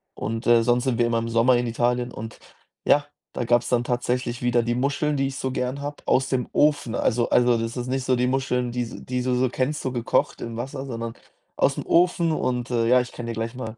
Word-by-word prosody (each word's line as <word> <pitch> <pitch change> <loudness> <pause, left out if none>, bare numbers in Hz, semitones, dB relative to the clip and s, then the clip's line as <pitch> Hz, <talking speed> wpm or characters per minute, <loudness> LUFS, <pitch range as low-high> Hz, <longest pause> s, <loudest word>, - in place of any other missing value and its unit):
Und, 115 +2 -4
äh, 120 -1 +6
sonst 120 +1 +2
sind 120 -3 0
wir 120 - +3
immer 115 -1 +1
im 115 0 -3
Sommer 115 +2 +4
in 120 - 0
Italien 120 +1 0
und 110 +1 -8 0.5
ja, 145 0 +4 0.3
da - - -2
gab's 120 0 +2
dann 120 -1 +2
tatsächlich 125 0 -1
wieder 120 -1 +3
die 120 0 -1
Muscheln, 140 +3 0
die 135 0 +1
ich 135 - -6
so 130 - -2
gern 130 +2 -2
habe, 145 +1 -5
aus 130 +1 +2
dem 125 -2 -1
Ofen. 145 -6 +2
Also 120 +1 +1
also, 120 -1 +4
das 115 +1 -3
ist 125 - -3
nicht 130 0 -1
so 130 - +3
die 125 0 +1
Muscheln, 125 -2 0
die 125 0 -1
s 115 - -8
die 125 0 -2
du 125 - 0
so 125 0 +2
kennst, 135 +4 -1
so 130 - -2
gekocht 120 -2 0
im 115 -1 -5
Wasser, 135 +3 -5
sondern 115 -2 -5 0.4
aus'm - - +1
Ofen. 170 -1 +3
Und, 125 -4 -1
äh, 115 -1 +1
ja, 125 +1 +5
ich 125 - -7
kann 120 - -6
dir 115 - -3
gleich 115 +2 -4
mal 115 -3 -6
125 Hz, 245 wpm, -24 LUFS, 120-130 Hz, 0.5 s, äh